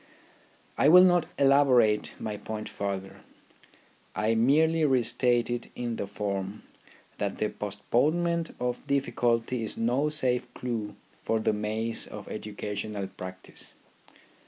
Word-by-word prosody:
I 145 - +6
will 180 +3 +9
not 175 -2 +4
elaborate 135 -6 +4
my 105 -1 -4
point 110 +1 -6
further; 95 -1 -4 1.0
I 105 +3 +1
merely 155 +8 +3
restate 120 -3 +2
it 120 0 -3
in 120 -2 -3
the 100 - -3
form, 100 0 -4 0.6
that 100 -1 -2
the 105 - 0
postponement 155 - 0
of 125 +2 -3
difficulty 125 -3 0
is 110 - -4
no 125 +6 +1
safe 130 -5 0
clue 115 -4 -4 0.3
for 110 - +1
the 110 - +1
maze 110 +2 -2
of - - -9
educational 105 -1 -5
practice. 95 -1 -9
115 Hz, 120 wpm, -28 LUFS, 105-135 Hz, 1.0 s, will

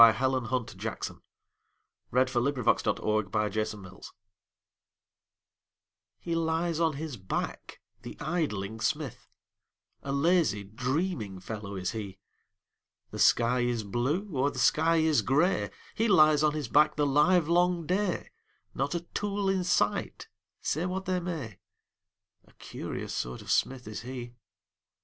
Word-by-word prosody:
Helen 125 +3 +5
Hunt 125 0 -2
Jackson - - -5 0.9
The 130 +1 +4
Poet's 130 +1 +1
Forge 105 -2 -1 2.2
HE 170 - -3
lies 165 0 0
on 165 -2 +2
his 145 -2 -5
back, 95 -2 -4 0.2
the - - -9
idling 110 - -2
smith, 135 +3 -2 0.7
A 140 - -4
lazy, 140 - +2
dreaming 120 - -2
fellow 100 +1 -6
is 90 -1 -2
he; 100 -4 -6 0.9
The - - -6
sky 120 +2 +4
is 120 -2 0
blue, 130 - -1
or 135 +2 +2
the 135 - -9
sky 160 +7 +3
is 160 -2 +3
gray, 155 +8 +2 0.2
He 225 - +1
lies 155 -7 +6
on 150 -1 +3
his 150 -4 -3
back 150 +5 +4
the 150 - +2
livelong 170 +3 +3
day, 185 +2 -1 0.4
Not 140 +6 -1
a 170 - -1
tool 200 +2 -2
in 190 -1 +1
sight, 175 - 0 0.4
say 165 +5 0
what 190 +1 -3
they 185 0 0
may, 160 - -5 0.9
A - - -23
curious - - -6
sort 60 0 -4
of - - -4
smith 130 -3 +1
is 110 - -5
he. 120 0 -7
140 Hz, 125 wpm, -29 LUFS, 110-165 Hz, 2.2 s, lies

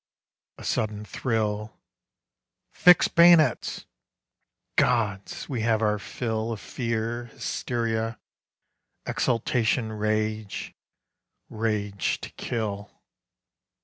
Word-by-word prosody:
A - - -11
sudden 105 -1 -1
thrill 105 0 -2 0.9
"Fix 180 -1 +6
bayonets!" 170 -6 +5 0.9
Gods! 105 -5 +1
we 125 -5 -2
have 110 0 +2
our 105 -1 +2
fill 110 +1 -3
Of 110 - -4
fear, 115 0 -3
hysteria, 115 -1 -2 0.9
exultation, 115 -1 0
rage, 110 0 -2 0.8
Rage 105 -3 -1
to - - -7
kill. 105 -4 -4
110 Hz, 80 wpm, -26 LUFS, 105-120 Hz, 0.9 s, Fix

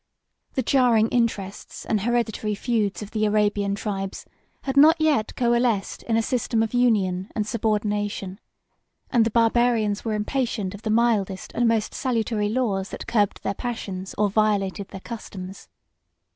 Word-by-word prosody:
The 260 - +1
jarring 235 -3 +3
interests 220 -5 -2
and 215 -3 0
hereditary 225 -2 0
feuds 210 -2 -1
of 205 - -10
the 215 -1 -1
Arabian 205 -1 +1
tribes 195 -2 -4 0.4
had 270 -1 -2
not 315 +4 +7
yet 300 -9 +1
coalesced 235 -4 +1
in 225 -1 0
a 225 - +2
system 230 -2 0
of 225 - -3
union 200 -6 +2
and 210 - 0
subordination; 210 -3 -1 0.7
and 230 -2 +4
the - - 0
Barbarians 230 -2 +2
were 220 -2 -1
impatient 210 -3 -2
of 205 - -9
the 220 - -3
mildest 215 -4 +1
and 240 0 +2
most 225 -2 +1
salutary 225 -4 -1
laws 210 -5 -1
that - - -7
curbed 205 -4 0
their 195 - -1
passions, 195 -5 -5
or 210 0 +3
violated 200 -2 +1
their 195 - -9
customs. 195 -5 -8
215 Hz, 150 wpm, -24 LUFS, 200-235 Hz, 0.7 s, not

